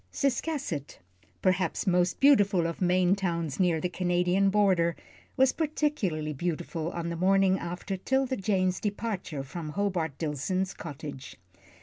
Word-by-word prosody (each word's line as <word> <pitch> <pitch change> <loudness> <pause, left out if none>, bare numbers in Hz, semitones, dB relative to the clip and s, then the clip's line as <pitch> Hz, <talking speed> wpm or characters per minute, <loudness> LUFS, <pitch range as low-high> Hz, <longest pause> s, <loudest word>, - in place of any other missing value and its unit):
Ciscasset, 275 - -2 0.5
perhaps 185 -1 +1
most 180 -2 +2
beautiful 205 -11 +5
of 165 +2 -4
Maine 180 +1 +3
towns 170 -6 -2
near 175 -3 +3
the 180 - -1
Canadian 180 +2 +1
border, 190 -5 +3 0.4
was 265 0 +5
particularly 280 - -1
beautiful 165 +1 -3
on 170 -1 -4
the 170 - -3
morning 190 +2 +3
after 180 +3 -4
'Tilda 265 +6 0
Jane's 185 -2 +1
departure 205 -8 -3
from 155 +3 -6
Hobart 170 -5 -1
Dillson's 170 +5 -2
cottage. 145 -3 -8
180 Hz, 125 wpm, -28 LUFS, 170-200 Hz, 0.5 s, beautiful